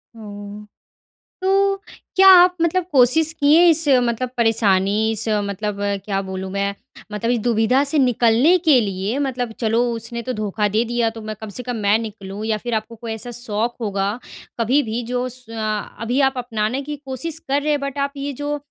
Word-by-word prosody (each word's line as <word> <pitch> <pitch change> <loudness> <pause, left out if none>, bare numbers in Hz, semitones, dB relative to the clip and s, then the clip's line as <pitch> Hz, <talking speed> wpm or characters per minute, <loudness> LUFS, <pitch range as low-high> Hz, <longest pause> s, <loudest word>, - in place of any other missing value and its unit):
हुँ। 205 -1 -10 0.8
तो, 390 +1 +2 0.4
क्या 385 0 +7
आप 360 +1 +5
मतलब 340 +2 +1
कोशिश 290 +5 +4
किए 305 +2 +4
इस 325 0 +4 0.2
मतलब 245 +1 -1
परेशानी 215 -2 +2
इस 225 0 -1 0.2
मतलब 200 +1 -4 0.3
क्या 195 -2 -1
बोलूँ 190 0 -6
मैं, 200 0 -1 0.4
मतलब 230 +3 -2
इस 245 - +2
दुविधा 235 +3 +2
से 290 +2 +1
निकलने 245 +5 +4
के 295 -6 +5
लिए 200 +3 -2
मतलब 250 -4 -2
चलो 225 0 +2
उसने 230 +1 -5
तो 255 - -3
धोखा 210 -2 -1
दे 215 +3 +1
दिया 235 -1 0
तो 225 0 -10
मैं 215 0 -6
कम 220 - -7
से - - -5
कम 245 -1 -4
मैं 205 +2 +4
निकलूँ 210 -2 -7
या 220 -1 0
फिर 240 - -1
आपको 220 +1 -4
कोई 225 0 -6
ऐसा 220 +2 -6
शौक़ 230 0 -2
होगा 200 -1 -1 0.5
कभी 255 +6 +2
भी 235 +2 -2
जो 250 0 -1
स 255 0 -9
अ, 215 -2 -4
अभी 245 +4 0
आप 270 -1 +3
अपनाने 240 +1 -2
की 295 +1 -6
कोशिश 270 +5 -4
कर 280 +1 +1
रहे 305 - -1
हैं 295 -1 +1
बट 280 0 -5
आप 280 0 -1
ये 280 +1 -4
जो 295 0 -1
235 Hz, 195 wpm, -20 LUFS, 215-275 Hz, 0.8 s, क्या